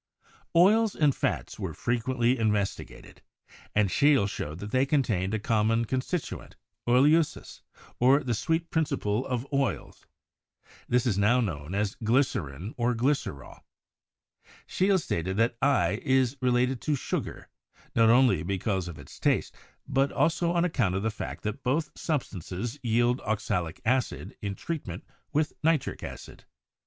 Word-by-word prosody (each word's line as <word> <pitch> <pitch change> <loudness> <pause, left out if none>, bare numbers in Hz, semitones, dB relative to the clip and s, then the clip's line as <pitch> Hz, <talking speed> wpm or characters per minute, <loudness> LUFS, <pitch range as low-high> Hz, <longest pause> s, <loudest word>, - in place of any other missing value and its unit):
Oils 210 +5 +5
and 145 -3 +3
fats - - -2
were - - -4
frequently 120 +1 0
investigated, 105 -3 -2 0.5
and 105 -2 +3
Scheele 140 -8 +4
showed 75 -5 -5
that 105 +3 -7
they 130 +2 +3
contained 110 -9 0
a - - -1
common 115 +1 +1
constituent, 130 +8 -3 0.3
oelsiiss, 150 +5 +2 0.4
or 135 +4 +5
the 120 - -1
"sweet 165 +8 -1
principle 125 -8 0
of 125 -1 -2
oils." 140 -2 -2 0.8
This 125 0 +2
is 105 -5 +1
now 110 +5 +4
known 85 -6 -3
as 100 -1 0
glycerin, 105 - 0
or 120 0 +1
glycerol. 120 - -2 1.1
Scheele 190 +1 +2
stated 95 - -2
that 115 +2 +2
i* 140 +1 +2
is 130 -2 +2
related 125 0 +1
to 150 - 0
sugar, - - -4 0.5
not 115 -1 +5
only 125 -7 +5
because 95 +1 -2
of 85 - -7
its - - -13
taste, - - +1 0.3
but 135 0 +1
also 165 +4 +1
on 175 0 +2
account 120 - 0
of 95 - -1
the 110 - 0
fact 110 - -7
that 110 +5 -3
both 145 +6 0
substances 120 - -4
yield 120 +1 +1
oxalic 100 -6 -2
acid 125 +2 -1
in 100 -1 -3
treat 165 - -5
ment 90 +1 -7 0.3
with 150 +1 0
nitric 160 -3 +1
acid. - - -9
120 Hz, 140 wpm, -28 LUFS, 105-140 Hz, 1.1 s, Oils